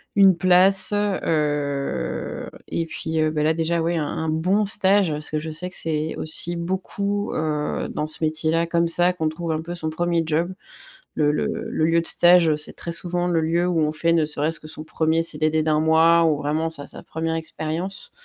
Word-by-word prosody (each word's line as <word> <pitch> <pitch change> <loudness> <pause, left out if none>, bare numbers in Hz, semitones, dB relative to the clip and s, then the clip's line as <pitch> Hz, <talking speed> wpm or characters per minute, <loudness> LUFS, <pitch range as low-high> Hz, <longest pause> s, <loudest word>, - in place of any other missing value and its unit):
une 195 -2 +6
place, 185 +3 +5
heu, 150 -8 -2 0.2
et 165 - -2
puis, 160 0 -4
heu, 155 - +2
ben 150 -1 -1
là 160 - +3
déjà 165 +1 -1
ouais, 170 +1 -1
un 155 - -1
un 160 - -4
bon 185 +7 +1
stage 195 -2 +3
parce 150 0 -4
que 155 - -2
je 160 +1 -6
sais 165 +4 -3
que 185 - -5
c'est 155 -1 -1
aussi 170 +2 -2
beaucoup, 200 +3 -3
heu, 150 -1 -2
dans 150 - -3
ce 155 +1 0
métier 155 0 +1
là 165 +1 +1
comme 170 0 +1
ça 175 +2 +3
qu'on 160 -3 -1
trouve 165 +1 -5
un 155 - -2
peu 170 +2 -7
son 160 -2 -2
1er 170 +1 0
job. 165 +4 -1 0.6
Le 150 -1 +2
le - - -1 0.2
le 155 - 0
lieu 165 +1 +3
de 165 - -2
stage, 175 -1 +5
heu, 155 - +3
c'est 150 - -4
très 170 - -6
souvent 175 0 -1
le 170 -2 +1
lieu 170 +2 0
où 175 -2 0
on 150 - +1
fait 165 +2 +1
ne 165 -2 +2
serait-ce 155 +2 -1
que 155 - -11
son 155 0 -3
1er 160 +1 0
CDD 155 -1 +1
d'1 155 0 +1
mois 165 +1 +4
ou 155 -3 +2
vraiment 155 +3 -1
sa 145 -3 -6
sa - - -10
1re 160 0 -3
expérience. 165 +3 -4
160 Hz, 215 wpm, -22 LUFS, 155-175 Hz, 0.6 s, une